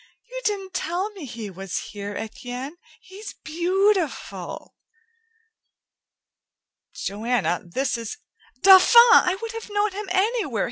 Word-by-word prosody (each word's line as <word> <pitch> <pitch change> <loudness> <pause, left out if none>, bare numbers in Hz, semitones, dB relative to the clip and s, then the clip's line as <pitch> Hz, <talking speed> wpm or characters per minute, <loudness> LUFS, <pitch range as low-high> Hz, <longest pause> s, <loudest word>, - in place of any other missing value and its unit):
"You - - -5
didn't 390 -3 -2
tell 365 +4 -2
me 385 -7 -9
he 225 -5 -7
was 190 0 -5
here, 205 -1 -6
Etienne. 245 +6 -6 0.3
He's 390 +3 -10
beautiful!" 360 +2 -1 2.2
"Joanna, 215 -3 -1
this 250 +7 -2
is 230 -2 -6 0.2
" 255 - -31
"Dauphin! 385 +4 +7 0.2
I 370 -4 +5
would 455 0 -5
have 455 -1 -8
known 410 0 0
him 400 0 -6
anywhere. 390 - 0
360 Hz, 120 wpm, -23 LUFS, -, 2.2 s, Dauphin